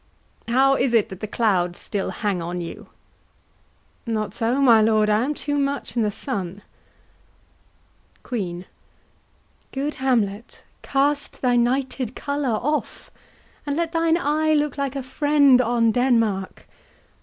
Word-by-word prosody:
How 265 +3 +4
is 250 -2 +1
it 220 - +3
that 190 - -9
the 215 - -5
clouds 185 -6 0
still 200 -2 -3
hang 200 -5 -2
on 175 +1 -4
you? 170 -1 -8 1.2
HAMLET. 225 -2 0
Not 210 -2 -4
so, 235 +3 0
my 235 -5 +6
lord, 215 -1 +3
I 210 +2 +2
am 295 +3 -2
too 290 0 -2
much 280 -4 -2
i' 235 - +1
the 210 - +1
sun. 200 -4 -5 1.6
QUEEN. 180 -7 -4 1.1
Good 285 +3 -2
Hamlet, 230 -5 -1 0.2
cast 285 +1 -1
thy 250 -1 +3
nighted 255 0 0
colour 285 -2 -2
off, 300 +3 -3 0.6
And 285 +1 -1
let 335 -1 -1
thine 330 0 +2
eye 310 0 +1
look 295 -2 0
like 280 -1 -3
a 275 - -3
friend 280 -1 +4
on 235 -1 +2
Denmark. 230 -6 0
245 Hz, 140 wpm, -23 LUFS, 215-280 Hz, 1.6 s, my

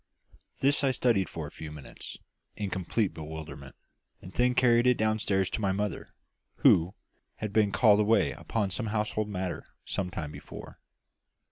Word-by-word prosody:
This 140 +2 +3
I 135 - +4
studied 120 -7 +2
for 80 -2 -5
a 75 - -8
few 80 -1 -8
minutes, 75 -3 -9 0.4
in 100 -2 -3
complete 95 +3 0
bewilderment, 75 -3 -8 0.4
and 90 - -11
then 125 +1 +2
carried 120 -1 +5
it 125 - +5
downstairs 110 -3 +1
to - - -2
my 100 -2 +2
mother, 100 +1 -2 0.6
who 90 +4 +5 0.4
had 105 -2 -5
been 105 -2 +3
called 105 -2 +5
away 105 +2 +3
upon 105 -4 -2
some 110 +4 -2
household 105 0 -1
matter 95 -3 -3 0.2
some 95 -2 -2
time 80 -5 -5
before. - - -10
105 Hz, 155 wpm, -29 LUFS, 90-110 Hz, 0.6 s, carried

